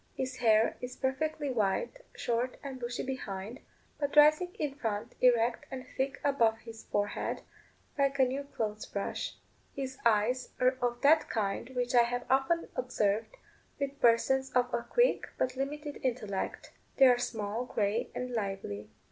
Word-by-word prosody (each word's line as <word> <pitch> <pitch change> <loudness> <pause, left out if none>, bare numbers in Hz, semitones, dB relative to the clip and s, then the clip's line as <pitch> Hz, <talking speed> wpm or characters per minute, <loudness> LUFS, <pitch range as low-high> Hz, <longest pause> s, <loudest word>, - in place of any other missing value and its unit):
His 260 0 -3
hair 225 -2 +4
is 250 0 -5
perfectly 290 +2 -1
white, 230 - 0 0.2
short 240 +2 -1
and 270 -2 -6
bushy 240 0 -3
behind, 225 -3 -5 0.4
but 285 -1 -2
rising 305 +4 +6
in 295 -3 -2
front 220 -7 -3
erect 240 -1 +3
and 260 0 -6
thick 270 +1 -1
above 235 -6 +3
his 225 -1 -11
forehead, 205 0 -2 0.6
like 275 0 +2
a 265 - +5
new 265 +2 -2
clothes 215 -6 -4
brush. 200 - -3 0.4
His 265 -1 -5
eyes 235 +3 +2
are 255 +1 +4
of 240 0 -1
that 310 +3 +5
kind 210 +1 -1
which 245 0 -1
I 240 - +7
have 245 +1 -1
often 270 +6 +2
observed 225 - 0 0.4
with 280 0 -3
persons 265 +3 +4
of 250 0 +2
a 235 - +1
quick, - - +2
but 255 0 0
limited 290 +2 -4
intellect 225 -7 -3 0.3
they 270 - +8
are 245 -2 +6
small, 220 0 -2
grey, 210 -2 0
and 250 0 -3
lively. 195 - -4
250 Hz, 155 wpm, -31 LUFS, 225-270 Hz, 0.6 s, they